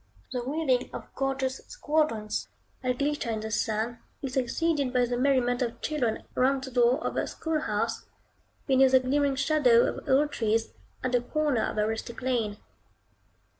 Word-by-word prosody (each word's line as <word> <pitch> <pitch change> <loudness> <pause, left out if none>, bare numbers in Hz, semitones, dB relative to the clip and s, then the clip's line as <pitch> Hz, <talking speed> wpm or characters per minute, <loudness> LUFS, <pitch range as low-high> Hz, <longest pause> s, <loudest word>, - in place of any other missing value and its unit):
The 250 - -2
wheeling 265 -2 0
of - - -8
gorgeous 270 -1 -1
squadrons, 300 - -1 0.3
that 250 -1 -1
glitter 290 -3 -1
in 220 -1 -2
the 220 0 -5
sun, 220 +2 -1 0.2
is 265 -2 -3
succeeded 280 +2 0
by 250 -1 +3
the 245 0 -2
merriment 250 -1 +2
of 235 -1 -2
children 255 -8 -1
round 265 +1 +2
the 265 - -6
door 245 +1 +4
of - - -2
a - - 0
school 320 -1 -2
house, - - -2 0.6
beneath 265 -1 +4
the 260 - +8
glimmering 275 +2 +1
shadow 265 -5 +4
of - - -4
old 290 +3 +4
trees, 225 0 0 0.3
at 255 - 0
the 245 -1 +3
corner 290 -1 0
of - - -3
a 210 - +3
rustic 225 +2 -5
lane. 230 -5 0
255 Hz, 170 wpm, -28 LUFS, 235-280 Hz, 0.6 s, the